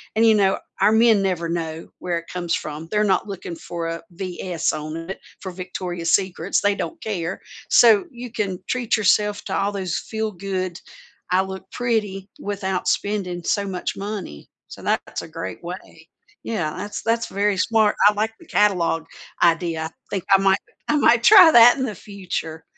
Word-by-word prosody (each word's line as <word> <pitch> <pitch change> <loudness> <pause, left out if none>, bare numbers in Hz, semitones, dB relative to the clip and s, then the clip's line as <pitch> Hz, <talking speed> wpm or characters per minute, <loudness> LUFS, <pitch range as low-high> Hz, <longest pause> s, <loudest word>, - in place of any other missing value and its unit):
and, 225 +1 +4
you 225 - +6
know, 195 -2 +2 0.2
our 215 - +5
men 225 -2 +5
never 180 -3 -1
know 165 -1 -4
where 175 -1 -2
it 165 - -7
comes 175 -2 -1
from. 155 +2 -6
They're 210 0 +2
not 200 +1 +1
looking 190 -3 -6
for 170 -1 -5
a 165 0 -5
"VS" 180 -1 -2
on 155 +1 -5
it 190 - -5 0.2
for 190 - -5
Victoria's 180 -2 -4
Secrets. 190 -2 +1
They 205 0 +3
don't 330 +10 -5
care. 190 -4 -3 0.3
So 225 - +6
you 245 -2 -8
can 195 -5 -3
treat 245 -3 0
yourself 210 0 +2
to - - -4
all 200 +1 0
those 190 -3 -2
feel 220 -1 -3
good, 185 -2 -4 0.5
"I 185 +1 +4
look 190 0 -7
pretty" 210 -5 -2
without 190 -2 -3
spending 190 -4 -1
so 200 +4 0
much 185 -2 -4
money. 195 - -6 0.2
So - - -10
that - - +1
that's - - -6
a - - -9
great 95 +4 -7
way. 170 -2 -9 0.4
Yeah. 175 -9 -2
That's 205 0 -5
that's 230 0 0
very 200 -1 0
smart. 215 +2 +2
I 210 - +5
like 215 +2 -1
the - - -16
catalog 175 -5 +2 0.4
idea. 165 -1 +2
I - - -4 0.2
think 195 -3 -3
I - - +9
might 195 0 +3 0.3
I 300 - +2
might 235 -4 +4
try 380 -6 +9
that 240 -2 +8
in 265 - -1
the 215 -5 -4
future. 175 -5 -6
195 Hz, 185 wpm, -22 LUFS, 175-215 Hz, 0.5 s, I